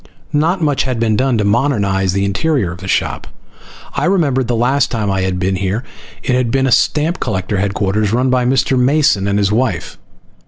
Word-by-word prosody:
Not 165 +4 +1
much 145 -3 +1
had 130 -3 -2
been 110 -2 +1
done 130 0 +1
to 105 - 0
modernize 100 -5 +1
the 100 0 0
interior 100 - 0
of 90 - -9
the 95 - -8
shop. - - -1 0.7
I - - -1
remembered 150 -9 +1
that 120 - -2
the - - -2
last 135 +4 +2
time 105 -4 -2
I 95 -1 0
had 95 -1 -1
been 95 +1 -1
here 100 +5 -2 0.4
it 125 - 0
had 125 -2 +1
been 135 +2 +1
a 135 - +1
stamp 155 +8 +1
collector 100 -3 -2
headquarters 100 +1 0
run 125 +3 +1
by 125 -1 +2
Mr. 130 0 +1
Mason 130 -6 +2
and 100 0 0
his 100 -1 +1
wife. 120 +3 -1
115 Hz, 205 wpm, -16 LUFS, 100-135 Hz, 0.7 s, last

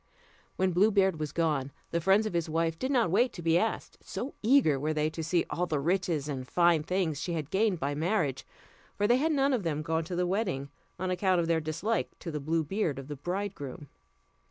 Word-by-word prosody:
When 190 0 +1
Blue 190 +5 +4
Beard 190 -5 +2
was 150 -2 -3
gone, 150 -5 0 0.2
the 170 - 0
friends 195 +5 +4
of 215 - -3
his 170 -1 -1
wife 165 0 0
did 260 - -1
not 240 -11 +2
wait 235 +6 +3
to 175 - -8
be 165 0 +3
asked, 225 - -3
so 265 - -5
eager 220 - +4
were 155 +2 -1
they 155 +1 +1
to 160 - -5
see 170 +2 +1
all 180 +1 -1
the 155 -3 0
riches 170 -2 0
and 130 -3 -4
fine 170 -1 +3
things 165 -3 -1
she 175 - -2
had 155 -2 -4
gained 200 -3 +2
by 140 +2 -1
marriage; 155 -3 0 0.5
for 205 - +1
they 240 +4 +4
had 315 +5 +1
none 275 -2 +2
of 245 - +1
them 155 -4 -2
gone 160 +1 0
to 175 +2 -4
the 180 +1 +1
wedding, 180 -8 -1 0.3
on 185 0 -2
account 185 0 +2
of 170 - +1
their 165 -1 +1
dislike 165 +9 -2
to 170 - -6
the 150 - -3
blue 160 +3 0
beard 160 -3 -1
of 135 +1 -8
the 145 - -4
bridegroom. 175 -3 -5
170 Hz, 225 wpm, -29 LUFS, 155-195 Hz, 0.5 s, Blue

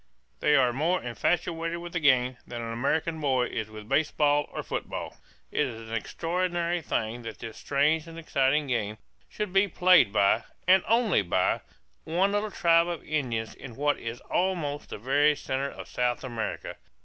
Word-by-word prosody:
They 150 - +4
are 125 -3 +4
more 165 +8 +1
infatuated 165 +6 -1
with 175 0 -8
the 175 - 0
game 130 -4 +3
than 120 - -6
an 115 0 -4
American 160 +7 0
boy 130 -4 +2
is 110 -1 -4
with 110 -1 -10
baseball 145 0 +2
or - - -5
football. - - -5 0.4
It 150 - +1
is 120 - -6
an 115 - -4
extraordinary 175 +6 -1
thing 115 -4 -2
that 115 -3 -7
this 115 -1 -8
strange 150 +3 +1
and 165 0 -10
exciting 145 -2 +1
game 110 -5 -2 0.3
should 210 -3 -4
be 195 +1 +4
played 180 - +5
by, 100 +2 +3 0.2
and 185 0 +6
only 225 - +3
by, 85 - +1 0.4
one 180 +5 +1
little 205 +1 0
tribe 170 -3 +3
of 170 -2 -4
Indians 120 -7 -2
in 125 -4 -10
what 145 +2 +1
is 115 +1 -6
almost 170 -6 -1
the - - -6
very 145 +6 +3
centre 135 0 -2
of - - -9
South 125 -1 -1
America. 120 -4 -4
145 Hz, 175 wpm, -27 LUFS, 120-170 Hz, 0.4 s, and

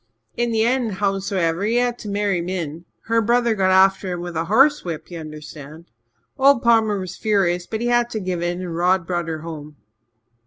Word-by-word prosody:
In 240 0 -1
the 220 -1 +2
end, 240 -2 0
howsomever, 195 -3 -1
he 220 +3 0
had 245 0 +1
to 210 - -7
marry 200 -3 0
Min. 170 -2 -5 0.2
Her 230 0 +1
brother 235 +1 +2
got 190 -3 +1
after 190 0 +3
him 175 -1 -4
with 175 -1 -6
a 160 +1 -1
horse 270 - +4
whip, 170 0 -6
ye 170 - -6
understand. 155 0 -10 0.5
Old 275 -2 +5
Palmer 225 -3 +3
was 185 -1 -7
furious 185 -5 0
but 220 0 -4
he 240 - -1
had 240 0 +2
to 220 - -3
give 185 -3 -3
in 175 +1 -2
and 170 -2 -5
Rod 180 +1 +2
brought 175 -1 -2
her 160 -1 -4
home. 155 -2 -8
190 Hz, 200 wpm, -21 LUFS, 170-225 Hz, 0.5 s, Old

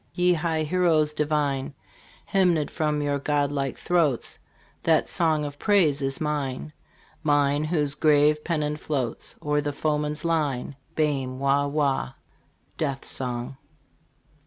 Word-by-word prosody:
Ye 180 0 +4
high 160 -1 0
heroes 155 -2 +2
divine, 145 -3 -1 0.5
Hymned 175 -6 +2
from 150 -2 0
your 145 -1 0
god 145 0 0
like 135 -2 -2
throats 160 -8 0 0.4
That - - +3
song 160 -3 +1
of 145 0 -7
praise 170 -9 +3
is 135 0 -1
mine! 150 -1 -3 0.5
Mine, 145 -1 +2
whose 150 -3 0
grave 150 0 +3
pennon 150 -3 -1
floats 140 -6 -3
O'er 150 0 +1
the 145 0 -2
foeman's 150 +1 -2
line. 145 -5 -1 0.2
Bairn 135 -4 0
wah 140 +1 +2
wah! 140 -3 0 0.6
Death 140 -4 -2
Song. 125 +1 -2
150 Hz, 125 wpm, -25 LUFS, 140-155 Hz, 0.6 s, Ye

